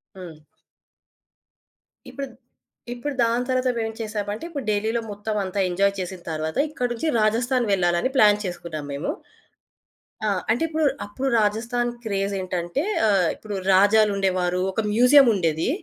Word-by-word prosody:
హ్మ్. 165 -5 -11 1.7
ఇప్పుడు 280 -1 -5
ద్ - - -19 0.6
ఇప్పుడు 270 +4 -4
దాని 235 +2 0
తర్వాత 255 0 +1
మేవేం 225 -1 -2
చేశామంటే, 210 +1 -4
ఇప్పుడు 285 -6 -5
ఢిల్లీలో 220 +3 0
మొత్తవంతా 205 -2 -3
ఎంజాయ్ 200 +3 +2
చేసిన 185 0 -5
తర్వాత 155 0 -3
ఇక్కడి 250 -5 -3
నుంచి 240 +7 -2
రాజస్థాన్ 240 +4 +1
వెళ్ళాలని 175 +4 +1
ప్లాన్ 210 -4 +6
చేసుకున్నాం 170 -5 -5
మేము. 140 +2 -3 1.2
ఆ! - - +2 0.2
అంటే, 235 +7 +1
ఇప్పుడు 315 -1 0 0.2
అప్పుడు 260 +7 -3
రాజస్థాన్ 235 +3 0
క్రేజేంటంటే 195 - -2 0.2
ఆహ్, 195 -4 +3
ఇప్పుడు 210 -2 -7 0.2
రాజాలుండేవారు, 195 -3 +3
ఒక 205 - -1
మ్యూజియముండేది, 225 - +4
210 Hz, 120 wpm, -23 LUFS, 185-240 Hz, 1.7 s, ప్లాన్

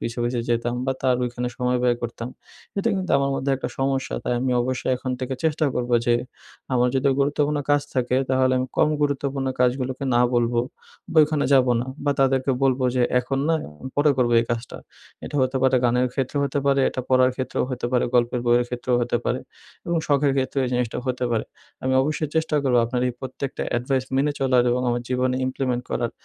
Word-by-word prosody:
পিছে, 115 +1 -4
পিছে 120 0 -1
যেতাম 120 0 0
বা 135 - +2
তার 130 -2 +3
ওইখানে 125 0 -3
সময় 125 0 0
ব্যয় 120 -1 +3
করতাম 115 0 -4 0.5
এটা 200 - +1
কিন্তু 185 -1 -3
আমার 140 0 0
মধ্যে 135 +1 -1
একটা 130 - -4
সমস্যা 135 0 -1
তাই - - 0
আমি 130 0 0
অবশ্যই 130 +1 -2
এখন 130 +1 -5
থেকে 130 +1 -2
চেষ্টা 155 -1 +2
করবো 120 0 0
যে 120 - +4 0.6
আমার 125 -1 +3
যদি 135 +1 +2
গুরুত্বপূর্ণ 145 +1 +1
কাজ 145 0 +4
থাকে 125 -1 +1
তাহলে 130 0 +3
আমি 130 - -1
কম 155 - +4
গুরুত্বপূর্ণ 140 -1 -1
কাজগুলোকে 130 +1 0
না 120 - +4
বলবো। 120 0 +2 0.5
বা - - -5
ওইখানে 150 -1 +1
যাবো 130 -2 +4
না 125 - -4 0.2
বা 145 - +2
তাদেরকে 135 0 +2
বলবো 130 -1 +2
যে 125 - +3 0.2
এখন 135 +2 -3
না 165 - +3 0.4
পরে 145 +1 +4
করবো 120 -2 +2
এই - - -2
কাজটা। 120 0 -3 0.5
এটা 145 - -5
হতে 130 +1 0
পারে 130 0 +4
গানের 125 +1 +3
ক্ষেত্রেও 135 +2 -1
হতে 140 0 -1
পারে 140 0 +3
এটা - - -3
পড়ার 130 0 +5
ক্ষেত্রেও 130 - -1
হতে 125 -1 -3
পারে, 125 - +3
গল্পের 120 0 +2
বইয়ের 120 0 +4
ক্ষেত্রেও 125 0 -1
হতে 120 0 0
পারে - - 0 0.5
এবং 170 - 0
শখের 140 -1 +2
ক্ষেত্রেও 135 +1 0
এই - - -1
জিনিসটাও 125 -1 -1
হতে 125 0 -1
পারে। 115 -2 0 0.4
আমি 130 - 0
অবশ্যই 150 +2 -1
চেষ্টা 160 -1 +1
করবো 125 -3 +3
আপনার 125 +1 -2
এই - - -3
প্রত্যেকটা 130 +1 -5
অ্যাডভাইস 130 +2 0
মেনে 145 +2 +2
চলার 130 -2 +3
এবং 125 +1 +1
আমার 120 0 0
জীবনে 125 0 +1
implement 130 -1 -2
করার 120 -1 -1
130 Hz, 200 wpm, -23 LUFS, 125-135 Hz, 0.6 s, পড়ার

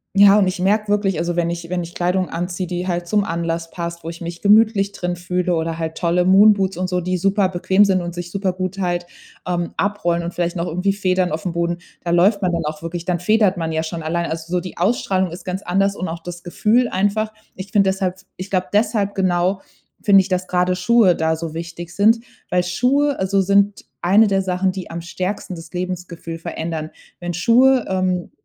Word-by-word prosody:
Ja, 200 +1 +7
und 200 - +3
ich 185 - -3
merke 210 +4 +1
wirklich, 200 -4 +1
also, 170 +1 -1
wenn 170 -1 +1
ich 170 0 -5
wenn 180 0 -2
ich 170 +1 -9
Kleidung 180 +1 0
anziehe, 175 +2 -3
die 180 +1 -4
halt 175 -1 -2
zum 205 +2 +1
Anlass 165 -1 -3
passt, 170 -1 -6
wo - - -5
ich 165 0 -7
mich 170 0 -6
gemütlich 210 -1 +4
drin 180 -2 -3
fühle, 180 0 -1
oder 165 0 -2
halt 160 -1 -4
tolle 175 0 +1
Moonboots 195 0 +5
und 185 0 -1
so, 180 0 0
die 185 +1 -1
super 195 +1 +2
bequem 190 +2 +3
sind 190 -2 +2
und 175 -1 -5
sich 175 0 -6
supergut 185 0 -2
halt, 175 -2 -1 0.4
ähm, 175 -1 -2
abrollen 175 -4 0
und 170 +1 -4
vielleicht 175 0 -1
noch 170 0 -1
irgendwie 180 +4 0
Federn 185 -2 +1
auf'm 160 +3 -3
Boden, 170 0 -1 0.3
da 170 - -2
läuft 190 +5 +4
man 180 -3 0
dann 165 -1 -1
auch 155 +1 -4
wirklich, 170 +1 -5
dann 175 -2 -1
federt 200 0 +2
man 165 -1 -2
ja 160 0 -1
schon 165 +1 -5
allein. 170 +2 -2
Also, 165 +1 -5
so 180 0 +1
die 180 0 -9
Ausstrahlung 190 -1 +1
ist 170 - -9
ganz 185 +2 -4
anders 195 +2 +1
und 185 - -4
auch 165 +1 -6
das 175 0 -8
Gefühl 220 +7 +2
einfach. 205 +3 0 0.2
Ich 190 +1 -8
finde 200 -2 +4
deshalb 190 -1 -2 0.2
ich 185 +2 -7
glaube 185 -1 0
deshalb, 210 -1 +1
genau, 185 0 +1 0.4
finde 195 -2 +6
ich, 190 - -8
dass 185 -1 -1
grade 180 0 +1
Schuhe 190 0 +4
da 160 0 +1
so 160 -1 -5
wichtig 170 +1 -7
sind, 220 +4 +4 0.3
weil 180 0 +2
Schuhe, 265 +10 +1
also, 190 +1 +1
sind 200 +1 +2 0.2
eine 200 +5 +5
der 195 -1 +1
Sachen, 185 0 0
die 185 -2 -7
am 165 0 -5
stärksten 185 +2 -4
das 165 -1 -10
Lebensgefühl 180 -2 -5
verändern. 160 -1 -5 0.3
Wenn 175 0 -4
Schuhe, 250 +7 +4
ähm, 185 -2 -1
180 Hz, 215 wpm, -20 LUFS, 170-195 Hz, 0.4 s, Ja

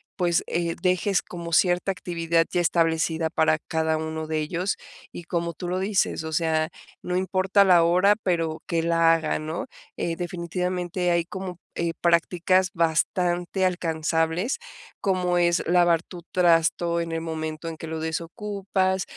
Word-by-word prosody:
pues, 175 -3 +1
eh, 170 0 -1
dejes 185 +1 +2
como 170 -1 -7
cierta 180 +2 +3
actividad 170 -3 0
ya 180 - +1
establecida 160 -1 +1
para 160 -1 +2
cada 160 0 -1
uno 160 0 -4
de 155 0 -1
ellos. 175 +5 -1 0.4
Y 175 - -9
como 170 0 -2
tú 180 - -6
lo 180 +1 -1
dices, 190 -4 0
o 160 - -5
sea, 160 -1 +1 0.3
no 180 - -2
importa 190 +2 +3
la 180 -3 +6
hora, 185 +5 +4
pero 165 -3 -1
que 165 -1 0
la 165 0 +4
haga, 160 -2 0
¿no? 155 +2 -4 0.3
Eh, 165 -1 -2
definitivamente 180 0 -2
hay 170 -1 +1
como, 185 -1 -7 0.2
eh, 170 0 -1
prácticas 175 +2 +2
bastante 175 +3 0
alcanzables, 165 - 0 0.4
como 180 -3 +1
es 170 0 +3
lavar 175 -1 +4
tu 175 0 -11
trasto 170 -1 +3
en 170 0 -3
el 165 0 -2
momento 160 0 -4
en 165 -1 -5
que - - -7
lo 160 0 -4
desocupas, 190 +3 -2
170 Hz, 155 wpm, -25 LUFS, 165-180 Hz, 0.4 s, la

